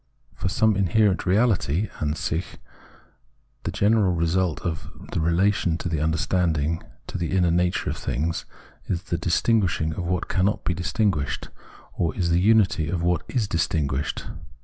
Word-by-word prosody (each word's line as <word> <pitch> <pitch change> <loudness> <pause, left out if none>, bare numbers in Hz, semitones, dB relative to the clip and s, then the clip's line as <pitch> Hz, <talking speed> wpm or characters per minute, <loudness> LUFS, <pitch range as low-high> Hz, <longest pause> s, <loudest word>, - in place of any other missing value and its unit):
For - - -3
the 105 +4 +2
inherent 100 +1 +3
reahty 100 - +2
(Atisich), 80 +3 -3 1.1
the - - -1
general 105 -3 +3
result 85 0 0
of 80 -2 -4 0.2
the - - -1
relation 85 +2 +2
of 85 +1 -3
the 80 - 0
understanding 80 0 0 0.2
to - - -5
the 85 +3 0
inner 90 -2 +3
nature 90 +1 +1
of - - -5
things, 80 +7 -2 0.4
is 90 -2 -2
the 85 - -2
distinguishing 90 -3 +1
of 90 - -4
what 90 0 -1
cannot 95 +3 +1
be 90 - 0
distinguished, 90 -3 -1 0.4
or 85 - -1
is 85 -3 0
the 85 +1 +3
unity 100 -6 +3
of 85 -1 -1
what 85 -2 +2
is 115 -5 -1
distinguished. 75 -5 -1
90 Hz, 150 wpm, -24 LUFS, 80-95 Hz, 1.1 s, inherent